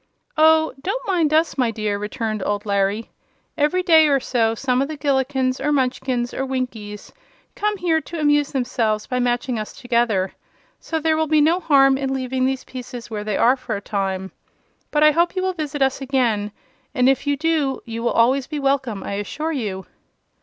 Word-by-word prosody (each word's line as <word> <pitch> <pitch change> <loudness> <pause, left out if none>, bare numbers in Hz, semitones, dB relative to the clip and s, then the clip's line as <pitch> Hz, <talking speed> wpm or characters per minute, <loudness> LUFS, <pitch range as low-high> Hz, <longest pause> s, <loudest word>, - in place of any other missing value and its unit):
"Oh, 315 0 +4
don't 470 - -3
mind 340 -6 +2
us, 315 -2 +2
my 245 -2 +3
dear," 215 -2 -2
returned 215 0 -3
old 205 0 -2
Larry. 200 +2 0 0.4
"Every 310 +5 +1
day 320 -3 +6
or 280 -2 +3
so 230 -3 0
some 255 +1 0
of 275 - 0
the 310 0 -6
Gillikins, 265 -2 0
or 295 - +1
Munchkins, 255 -3 -1
or 270 - -2
Winkies 245 -6 -5 0.4
come 420 0 -1
here 335 -3 +1
to 335 +1 -7
amuse 295 -1 +2
themselves 235 -5 -1
by 250 -1 -2
matching 245 -1 0
us 215 - -6
together, 235 -7 0 0.5
so 320 - -3
there 315 0 +1
will 315 0 0
be 310 0 +3
no 325 +4 +3
harm 270 -5 +4
in 270 -1 -1
leaving 260 0 -1
these 265 -1 -2
pieces 250 -2 -9
where 210 -1 -4
they 210 -1 -2
are 245 +3 +4
for 250 -4 -5
a - - -3
time. 190 -2 -3 0.6
But 300 0 +2
I 305 - +7
hope 340 +4 +1
you 370 - -1
will 375 0 0
visit 295 -4 -2
us 270 +1 0
again, 240 -6 0 0.4
and 250 -2 +3
if 270 +2 +2
you 285 0 +1
do 305 -3 0
you 230 0 -5
will 235 - +1
always 250 +3 +3
be 305 - -4
welcome, 270 -7 -1
I - - -5
assure 305 +10 -4
you." 205 -10 -4
265 Hz, 195 wpm, -21 LUFS, 230-300 Hz, 0.6 s, I